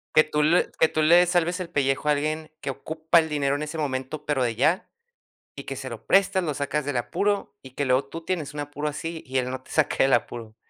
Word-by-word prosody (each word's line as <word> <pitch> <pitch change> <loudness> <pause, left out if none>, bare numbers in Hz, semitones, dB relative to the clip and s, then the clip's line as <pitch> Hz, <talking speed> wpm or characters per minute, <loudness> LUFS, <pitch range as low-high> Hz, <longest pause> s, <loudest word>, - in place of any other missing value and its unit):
Que 155 - +8
tú 150 -1 -1
le 170 +4 +3
que 160 - +6
tú 155 - -1
le 175 +3 +6
salves 175 +1 +1
el 175 -2 -5
pellejo 140 -1 0
a - - +6
alguien 155 +2 -2
que 135 - -2
ocupa 160 +4 +1
el 160 -1 -1
dinero 140 -2 0
en 145 - -3
ese 155 +2 -5
momento 145 +1 -3
pero 145 -4 +1
de 115 -2 -1
ya, 155 - +1 0.7
y - - -7
que - - -6
se - - -6
lo - - -9
prestas, 195 -1 +3
lo 150 -3 -1
sacas 145 +1 -2
del 140 -3 -2
apuro 200 - -1
y 130 - -12
que 140 +2 -2
luego 130 +1 +2
tú 165 +4 -8
tienes 160 -6 -3
un 150 - -6
apuro 145 +1 -3
así 160 +2 -6
y 130 0 -3
él 125 0 0
no 130 0 -5
te - - -16
saque - - +2
del 135 - +3
apuro. 115 -2 -1
150 Hz, 255 wpm, -25 LUFS, 135-160 Hz, 0.7 s, Que